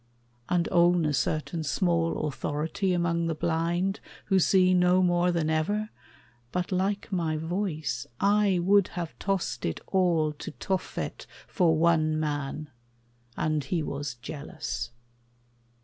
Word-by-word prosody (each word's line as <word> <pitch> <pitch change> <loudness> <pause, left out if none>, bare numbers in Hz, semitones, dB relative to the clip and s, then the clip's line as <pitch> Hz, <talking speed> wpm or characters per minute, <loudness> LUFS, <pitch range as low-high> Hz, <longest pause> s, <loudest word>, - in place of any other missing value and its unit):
And 175 -2 +2
own 175 -1 +4
a 150 - +1
certain 155 +4 -1
small 165 0 +1
authority 155 +6 -2
Among 170 -1 +1
the 165 - -1
blind, 170 +5 0 0.3
who 195 -2 +3
see 185 0 +4
no 180 +1 +4
more 175 0 +3
than 165 -3 0
ever, 205 +8 0 0.6
But 180 +1 -2
like 195 +3 -1
my 165 -4 0
voice, 160 - -2
I 200 -1 +3
would 200 +1 +5
have 170 -2 -3
tossed 195 -2 -1
it 80 - -2
all 170 -5 +2
To 145 - -7
Tophet 190 +3 -3 0.2
for 165 -5 +2
one 155 -1 +3
man; 145 0 -3 0.7
and 155 -1 0
he 160 +4 -1
was 140 -2 -4
jealous. 145 +6 -5
170 Hz, 130 wpm, -28 LUFS, 155-185 Hz, 0.7 s, would